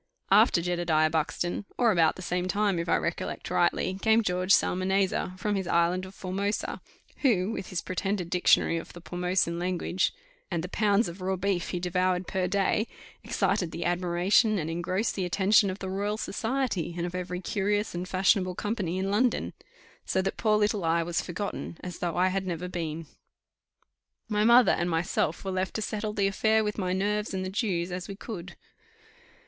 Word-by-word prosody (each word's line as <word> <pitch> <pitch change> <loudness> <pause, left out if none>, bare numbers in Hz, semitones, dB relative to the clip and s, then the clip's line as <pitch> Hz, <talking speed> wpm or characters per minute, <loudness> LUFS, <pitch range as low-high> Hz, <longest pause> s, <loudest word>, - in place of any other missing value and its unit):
After 200 -3 +5
Jedediah 170 -3 +1
Buxton, 165 +4 -1
or 235 -3 +4
about 165 -5 +3
the 185 - -8
same 180 +1 -1
time, 200 -2 +1
if 170 0 -3
I - - +4
recollect - - -3
rightly, 185 +1 +1
came 220 0 +4
George 180 0 0
Psalmanazar, 185 0 +2
from 210 +1 -1
his 190 -2 -2
Island 175 +2 +1
of 190 - -13
Formosa, 195 +3 -3 0.4
who, 215 -7 +2
with 195 -4 -5
his 180 - -3
pretended 185 -1 -2
Dictionary 180 -2 +3
of 165 - -7
the 175 - -10
Pormosan 175 -1 -1
language, 180 +1 0 0.4
and 170 -4 -2
the 180 - -5
pounds 210 +2 +2
of 170 +2 -8
raw 190 +1 0
beef 185 -1 -1
he 180 - -2
devoured 180 +1 0
per 185 -1 -1
day, 200 +3 +1 0.4
excited 175 - 0
the 170 - -5
admiration 180 +5 +2
and 165 -2 -2
engrossed 185 +6 -1
the 190 - -2
attention 195 +3 +3
of 185 - -4
the 190 - -6
Royal 200 +3 -2
Society 225 - -2
and 170 - -1
of 175 - -5
every 180 0 -4
curious 205 +2 -1
and 180 +2 -4
fashionable 185 -1 +2
company 200 -5 -2
in 190 +1 -1
London: 240 +4 +1 0.5
so - - 0
that 195 - -2
poor 215 -1 +2
little 210 -2 +1
I 165 +1 +2
was 170 0 -1
forgotten, 180 -1 -5
as 180 -1 -6
though 170 -2 -2
I 185 +1 +4
had 190 0 -2
never 180 0 -3
been. 165 -2 -4 1.2
My 210 -1 +1
mother 240 +1 +7
and 175 - 0
myself 165 0 -1
were 190 - -2
left 185 0 -2
to 220 - -1
settle 210 0 -3
the 200 -2 +1
affair 220 +3 +2
with 210 0 -3
my 185 -2 -1
nerves 205 +2 -1
and 185 0 -2
the 185 - -4
Jews, 190 -5 -1
as 180 +1 -4
we 200 - -6
could. 190 -4 -8
185 Hz, 185 wpm, -28 LUFS, 175-205 Hz, 1.2 s, mother